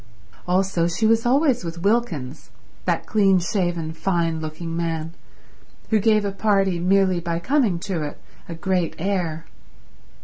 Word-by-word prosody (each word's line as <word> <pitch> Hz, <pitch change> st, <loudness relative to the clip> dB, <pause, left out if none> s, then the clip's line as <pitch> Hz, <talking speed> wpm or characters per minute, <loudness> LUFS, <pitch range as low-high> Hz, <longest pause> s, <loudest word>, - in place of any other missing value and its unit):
Also 180 Hz, -2 st, +1 dB
she 175 Hz, +6 st, -1 dB
was 225 Hz, +1 st, +3 dB
always 265 Hz, -, +3 dB
with 170 Hz, 0 st, -6 dB
Wilkins, 185 Hz, -, -1 dB, 0.4 s
that -, -, 0 dB
clean 195 Hz, -3 st, +3 dB
shaven, 175 Hz, -3 st, -1 dB
fine 165 Hz, -2 st, 0 dB
looking 160 Hz, +1 st, -5 dB
man, 165 Hz, -1 st, -2 dB, 0.8 s
who 220 Hz, -, +4 dB
gave 215 Hz, 0 st, +3 dB
a 200 Hz, -, -1 dB
party, 195 Hz, -3 st, +1 dB
merely 185 Hz, 0 st, +3 dB
by 170 Hz, -1 st, -2 dB
coming 225 Hz, -, +1 dB
to 180 Hz, -4 st, -3 dB
it, 150 Hz, -1 st, -5 dB, 0.3 s
a 170 Hz, -, -5 dB
great 180 Hz, 0 st, -1 dB
air. 170 Hz, -3 st, -2 dB
180 Hz, 140 wpm, -23 LUFS, 165-200 Hz, 0.8 s, who